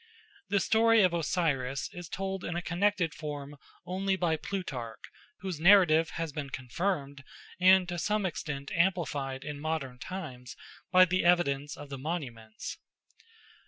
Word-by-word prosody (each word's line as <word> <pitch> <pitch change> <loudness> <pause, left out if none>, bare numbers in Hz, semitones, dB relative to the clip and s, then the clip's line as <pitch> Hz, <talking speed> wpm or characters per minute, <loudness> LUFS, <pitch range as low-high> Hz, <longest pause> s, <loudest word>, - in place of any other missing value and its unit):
The 200 - +3
story 225 +1 +4
of 180 -2 +3
Osiris 150 -6 0
is 175 -2 -8
told 190 0 -3
in 175 - -3
a 175 - -1
connected 180 -1 +1
form 145 -2 -6 0.3
only 190 +2 0
by 175 -4 +1
Plutarch, 135 - -5 0.4
whose 185 -5 -4
narrative 170 -3 +6
has 165 -2 -3
been 140 -1 -5
confirmed 140 +2 -3 0.4
and 185 0 +6
to 175 -1 -3
some 210 +2 0
extent 150 -5 -4
amplified 155 -7 0
in 145 -1 -6
modern 145 -5 -3
times 130 -9 -7 0.4
by 185 0 +8
the 185 +1 0
evidence 145 -5 +2
of 145 -1 -9
the 135 -1 -6
monuments. 125 -8 -5
165 Hz, 140 wpm, -30 LUFS, 140-185 Hz, 0.4 s, by